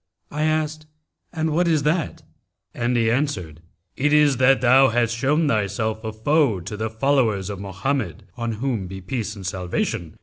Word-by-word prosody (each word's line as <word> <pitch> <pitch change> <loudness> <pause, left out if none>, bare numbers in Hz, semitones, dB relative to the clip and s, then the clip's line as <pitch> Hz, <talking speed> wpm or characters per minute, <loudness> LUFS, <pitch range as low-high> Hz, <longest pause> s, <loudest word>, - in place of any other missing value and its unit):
I 150 +1 -1
asked 155 0 -1 0.4
'And 160 -1 -1
what 170 +3 +2
is 155 -4 +2
that?'; 155 +2 -1 0.5
and 120 0 0
he 115 -1 +2
answered, 100 - -2 0.3
'It 145 +3 +1
is 150 -3 +4
that 130 +1 +4
thou 130 +2 +5
hast 115 -1 +1
shown 145 +6 +1
thyself 110 -1 -1
a 110 - -3
foe 120 - +2
to 95 +5 -7
the 110 +1 -3
followers 110 -5 +1
of 100 - -6
Mohammed 100 - -3
(on 115 -1 -3
whom 110 -4 -2
be 95 +1 -7
peace 110 +2 -4
and 100 -2 -9
salvation!) 90 -3 -3
120 Hz, 170 wpm, -22 LUFS, 105-145 Hz, 0.5 s, thou